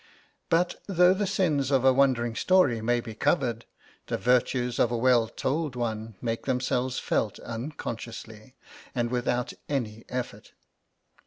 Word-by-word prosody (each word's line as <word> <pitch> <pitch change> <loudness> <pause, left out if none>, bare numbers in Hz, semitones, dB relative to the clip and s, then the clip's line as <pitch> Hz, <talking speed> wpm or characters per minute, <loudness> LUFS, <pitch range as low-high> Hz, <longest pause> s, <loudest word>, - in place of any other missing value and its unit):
But, 175 +1 +1
though 180 -1 +5
the 200 +1 -1
sins 150 -9 +1
of 135 -2 +2
a 130 - +7
wandering 125 -4 +2
story 160 -12 +3
may 120 +2 +1
be 115 -2 -8
covered, 120 -1 0 0.4
the - - -1
virtues 125 0 +1
of 120 - +4
a 120 - -1
well 120 -1 +4
told 140 +4 -2
one 110 -2 -3
make 115 -1 -3
themselves 125 0 0
felt 105 - -1
unconsciously, 115 -2 -7 0.4
and 120 -1 0
without 125 0 -1 0.2
an 115 -6 -2
effort. 125 -1 -5
125 Hz, 140 wpm, -27 LUFS, 115-135 Hz, 0.4 s, a